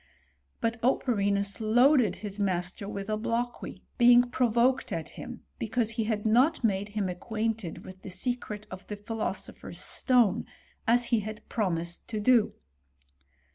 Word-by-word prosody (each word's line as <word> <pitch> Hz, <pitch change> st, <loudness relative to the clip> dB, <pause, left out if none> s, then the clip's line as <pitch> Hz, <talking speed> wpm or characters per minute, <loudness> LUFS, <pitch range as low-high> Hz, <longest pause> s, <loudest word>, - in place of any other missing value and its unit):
But 230 Hz, 0 st, -1 dB
Operinus 200 Hz, -6 st, +1 dB
loaded 240 Hz, -1 st, +4 dB
his 205 Hz, 0 st, -5 dB
master 185 Hz, 0 st, -1 dB
with 200 Hz, -1 st, -5 dB
obloquy, 230 Hz, +3 st, -3 dB, 0.2 s
being 245 Hz, 0 st, +6 dB
provoked 245 Hz, +1 st, +2 dB
at 165 Hz, -2 st, -3 dB
him 245 Hz, -1 st, -9 dB, 0.2 s
because 225 Hz, 0 st, 0 dB
he 225 Hz, -1 st, -1 dB
had 215 Hz, -1 st, -1 dB
not 255 Hz, +8 st, +3 dB
made 205 Hz, -2 st, +1 dB
him 200 Hz, -2 st, +1 dB
acquainted 220 Hz, 0 st, -3 dB
with 185 Hz, 0 st, -11 dB
the -, -, -8 dB
secret 210 Hz, 0 st, -4 dB
of 185 Hz, 0 st, -9 dB
the 210 Hz, -, -5 dB
philoso*^ 220 Hz, +2 st, -4 dB
pher's -, -, -9 dB
stone, 245 Hz, -7 st, +2 dB, 0.4 s
as 240 Hz, +1 st, +4 dB
he 230 Hz, -, +5 dB
had 215 Hz, +1 st, -7 dB
promised 170 Hz, -6 st, -2 dB
to 215 Hz, -, -3 dB
do. 230 Hz, 0 st, +3 dB
220 Hz, 140 wpm, -29 LUFS, 200-240 Hz, 0.4 s, being